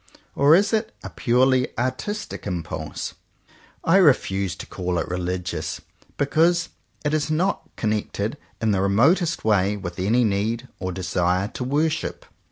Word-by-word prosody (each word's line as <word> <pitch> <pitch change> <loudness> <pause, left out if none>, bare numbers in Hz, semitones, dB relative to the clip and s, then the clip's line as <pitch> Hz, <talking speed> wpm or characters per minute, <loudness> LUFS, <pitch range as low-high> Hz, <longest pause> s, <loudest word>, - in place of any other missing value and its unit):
Or 145 +3 +6
is 205 +5 +2
it 220 0 0
a 95 - -7
purely 125 - +2
artistic 130 - -3
im 90 -4 -2
pulse? 80 -1 -5 0.7
I 165 +4 +5
refuse 100 - +3
to - - -8
call 90 -1 -3
it - - -1
religious, 90 -2 -3 0.4
because 165 +4 +2 0.4
it 145 - +1
is 155 0 0
not 175 +6 0
connected 110 +3 -2 0.2
in 110 -1 +1
the 95 -2 +1
remotest 150 - +3
way 105 -1 +2
with 90 -3 -6
any 110 +7 +3
need 110 +4 0
or 95 -1 -3
desire 90 +1 0
to 125 - -5
worship. 150 +5 -1
110 Hz, 145 wpm, -23 LUFS, 95-150 Hz, 0.7 s, Or